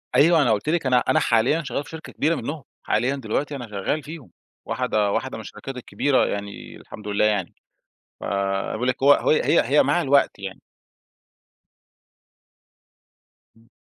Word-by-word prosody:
أيوة، 165 +2 +5
أنا 125 -5 +3
قُلت 110 +7 0
لِك 170 -3 0
أنا 125 -1 +4
أنا - - +2
حاليًا 125 +8 +2
شغّال 140 0 -3
في - - -14
شركة 160 0 -9
كبيرة 160 +3 +1
منهم، 145 +3 -5 0.2
حاليًا 125 +6 +1
دلوقتي 140 +3 -3
أنا 125 -4 -7
شغاّل 105 +9 -2
فيهم 150 - -10 0.3
واحدة 105 -2 0
واحدة - - -2
من - - -7
الشركات 135 -1 -8
الكبيرة 130 +2 +1
يعني، 100 0 -6
الحمد 105 -1 -11
لله 105 +1 +1
يعني، 105 -4 0 0.7
فأنا 100 0 -2
باقول 125 +4 -2
لِك 130 - -2
هو 140 +1 +7
هي 155 - +3
هي 170 - +4
هي 145 +2 +4
مع 175 - +1
الوقت 140 -1 +2
يعني. - - -7 3.0
إمم. 115 +2 -29
130 Hz, 160 wpm, -23 LUFS, 105-150 Hz, 3.0 s, هو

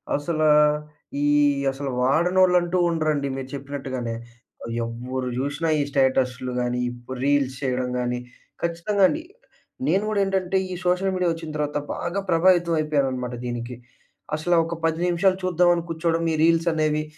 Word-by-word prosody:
అసలా 155 +1 +1 0.7
ఈ - - +2 0.5
అసలు 135 0 -4
వాడనోళ్ళు 180 +7 +4
అంటూ 175 +1 -1
ఉండరండి. 155 -4 0
మీరు 135 0 -6
చెప్పినట్టుగానే 130 -4 -4 0.7
ఎవ్వరు 125 +2 -4
చూషినా 145 +4 -1
ఈ - - +2
స్టేటస్‌లు 130 -2 +1
కానీ, 125 0 -1 0.4
రీల్స్ 140 -2 +2
చేయడం 125 -2 -1
గానీ 125 0 -1 0.4
ఖచ్చితంగా 170 +4 0
అండి 315 +2 -3 0.6
నేను 195 +2 +2
గూడా 215 -1 0
ఏంటంటే 190 -1 0
ఈ - - -3
సోషల్ 180 +2 +2
మీడియా 180 -1 +1
వచ్చిన 165 -1 -7
తర్వాత 150 0 -1 0.2
బాగా 175 +3 -3
ప్రభావితం 175 0 +4
అయిపోయాననమాట 135 -5 -1
దీనికి. 120 0 -4 0.6
అసలు 175 +3 +1
ఒక 165 - -4
10 160 0 +1
నిమిషాలు 185 +2 +2
చూద్దాం 180 -1 +3
అని 170 - -3
కూర్చోవడం 165 0 0
ఈ - - +1
రీల్స్ 165 +1 +3
అనేవి. 155 -1 +1
155 Hz, 140 wpm, -24 LUFS, 130-175 Hz, 0.7 s, వాడనోళ్ళు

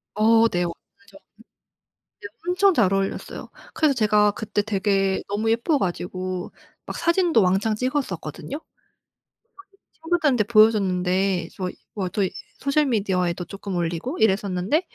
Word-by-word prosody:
어 225 +2 +5
네 175 0 0
완전. 195 +3 -10 1.0
네 - - -7 0.2
엄청 375 +1 +4
잘 200 -7 +3
어울렸어요. 195 0 -3 0.3
그래서 305 -3 +2
제가 210 -3 +3
그때 210 -1 -2
되게 195 -2 0
너무 210 +3 -1
예뻐 240 +7 +2
가지고 185 -1 -4 0.3
막 - - -6
사진도 340 - +3
왕창 195 +4 +2
찍었었거든요. 255 - -3
그걸 - - -43 1.1
제 - - -33
친구들한테 310 -9 +1
보여줬는데 195 -4 +2
저 185 -1 -3 0.3
뭐 190 -3 -1
도 200 +3 -1 0.4
소셜미디어에도 200 - 0
쪼끔 195 -1 -6
올리고 175 - -3
이랬었는데 200 - +1
205 Hz, 295 characters per minute, -23 LUFS, 185-235 Hz, 1.1 s, 어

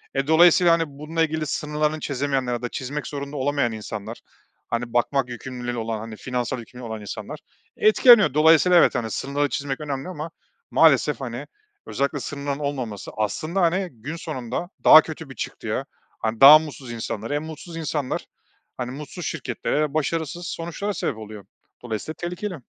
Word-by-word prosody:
E, 135 +1 0
dolayısıyla, 170 +2 +6
hani, 165 0 +2
bununla 150 +3 -2
ilgili 160 -1 -1
sınırlarını 150 +1 -1
çizemeyenler 135 -3 -1
ya 120 - -3
da 120 - -3
çizmek 140 +4 -5
zorunda 140 0 -5
olamayan 140 -2 +1
insanlar, 110 0 -6 0.5
hani, 120 0 -3
bakmak 125 +2 +1
yükümlülüğü 120 0 -5
olan, 115 -1 -3
hani, 110 0 -7
finansal 125 +1 -3
yükümlülüğü 120 +1 -10
olan 110 -1 -5
insanlar 105 - -7 0.4
etkileniyor. 215 - +6
Dolayısıyla 160 +4 +6
evet, - - +4
hani, 110 -2 -2
sınırları 140 +4 -1
çizmek 140 0 -3
önemli 140 +2 -4
ama 165 -2 -6 0.4
maalesef, - - +4
hani, - - -5 0.4
özellikle 140 +1 -1
sınırların 140 0 -4
olmaması 130 -8 -4
aslında, 155 - -1
hani, 180 +2 +1
gün 130 +6 -7
sonunda 155 0 -5
daha 155 - +10
kötü 160 -1 -8
bir 130 - -10
çıktıya, - - -4 0.3
hani, 110 0 -3
daha 145 +3 +11
mutsuz 145 -5 -8
insanlara, 115 +1 -4
hem 145 +1 -1
mutsuz 160 +2 -9
insanlar, 150 -4 -2 0.5
hani, 125 -1 -4
mutsuz 150 +5 -7
şirketlere, 150 +1 -2
başarısız 160 +2 -2
sonuçlara 170 +5 -4
sebep 110 - -2
oluyor. 105 -2 -9 0.4
Dolayısıyla 120 +6 -4
tehlikeli. 180 +3 -4
145 Hz, 155 wpm, -23 LUFS, 120-160 Hz, 0.5 s, daha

